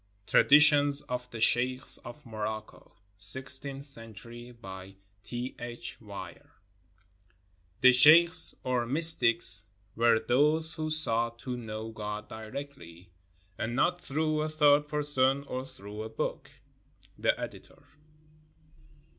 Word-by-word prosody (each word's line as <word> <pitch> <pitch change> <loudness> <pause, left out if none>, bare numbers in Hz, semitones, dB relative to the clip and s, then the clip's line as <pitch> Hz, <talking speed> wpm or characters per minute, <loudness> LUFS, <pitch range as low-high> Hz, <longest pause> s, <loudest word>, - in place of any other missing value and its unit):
J - - -15
TRADITIONS 145 -1 +5
OF 125 0 -5
THE 115 - -8
SHEIKHS 125 +3 0
OF 130 +5 -12
MOROCCO 110 -1 -6 0.3
[Sixteenth 135 +6 -1
century] 115 -2 -7
BY 95 -4 -11 0.3
T. 120 +3 -6
H. 120 -1 -8
WEIR 100 -5 -10 1.3
[The 130 0 +8
sheikhs, 160 +7 +6
or 125 -2 -1
mystics, 120 -7 +2 0.3
were 115 -1 +4
those 150 +8 +2
who 155 -1 -4
sought 115 -7 0
to 125 -1 -4
know 110 -1 -6
God 105 -1 -6
directly, 110 -7 -9 0.5
and 115 +2 -3
not 175 +6 +1
through 155 +2 -1
a 155 - -2
third 150 -1 +4
person 140 -2 +2
or 130 -1 -5
through 105 -2 -9
a 110 - -6
book. 110 - -4 0.7
The - - +1
Editor. - - -9
125 Hz, 115 wpm, -29 LUFS, 110-145 Hz, 1.3 s, The